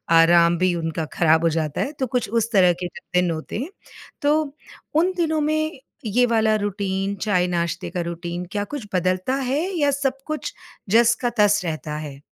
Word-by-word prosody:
आराम 170 +1 +6
भी 185 +1 +2
उनका 165 -1 -2
खराब 160 -1 +4
हो 165 - +4
जाता 155 -2 -2
है 280 - -1
तो 260 - 0
कुछ 250 +1 -1
उस 230 +1 0
तरह 185 -5 +5
के 180 - -1
जो 175 - -11 0.2
दिन 180 -1 0
होते 160 +3 -5
हैं, 275 +7 -4 0.5
तो 295 0 +1 0.4
उन 345 +4 +3
दिनों 315 -3 +1
में 310 -1 -1 0.3
ये 240 +4 +3
वाला 220 -2 +2
रुटीन, 200 -1 -2
चाय-नाश्ते 180 -3 -1
का 180 - -3
रुटीन 170 +1 -5
क्या 205 -1 -1
कुछ 245 0 -6
बदलता 185 +7 +1
है 270 +2 0 0.2
या 290 -1 +3
सब 270 -1 -1
कुछ 310 -1 -4 0.4
जस 230 +3 +5
का 245 - +1
तस 205 -1 +4
रहता 155 -2 -4
है? 145 -3 -8
200 Hz, 185 wpm, -22 LUFS, 170-260 Hz, 0.5 s, आराम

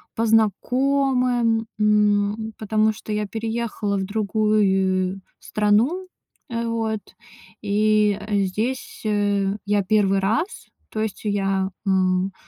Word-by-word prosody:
по 230 - 0
знакомым. 245 +1 +2
М, 210 +1 +2
потому 215 0 +1
что 215 0 -9
я 210 -1 -1
переехала 225 -2 -2
в 190 - -1
другую 195 -3 +1 0.2
страну. 225 - +1 0.4
Э, 235 -1 -2
вот. 225 -2 -2 0.6
И 210 0 +2
здесь, 210 +6 -2
э, 205 -1 +1
я 205 0 +1
1 195 -1 +2
раз. 225 - -1 0.2
То 220 - -5
есть 220 -2 -3
я, 195 -2 0 0.2
м, 185 0 +1
210 Hz, 105 wpm, -22 LUFS, 200-225 Hz, 0.6 s, знакомым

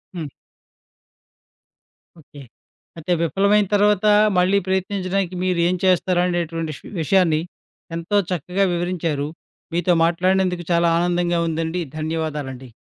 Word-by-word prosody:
హ్మ్. 160 -4 -5 1.9
ఓకే. 145 -1 -14 0.6
అయితే 165 +2 -1
విఫలమైన 200 +5 +2
తరువాత 205 0 +3 0.3
మళ్ళీ 185 +2 +3
ప్రయత్నించడానికి 190 -1 -1
మీరేం 180 -1 +1
చేస్తారు 180 -1 +2
అనేటటువంటి 165 -2 -2
విష - - -13
విషయాన్ని 160 -2 +2 0.5
ఎంతో 170 +5 -1
చక్కగా 180 +3 -1
వివరించారు. 170 -4 -2 0.5
మీతో 175 +1 +2
మాట్లాడినందుకు 180 +1 +1
చాలా 170 0 +3
ఆనందంగా 175 0 +1
ఉందండి 165 +2 -2 0.2
ధన్యవాదాలండి. 150 -5 -4
175 Hz, 100 wpm, -21 LUFS, 165-185 Hz, 1.9 s, తరువాత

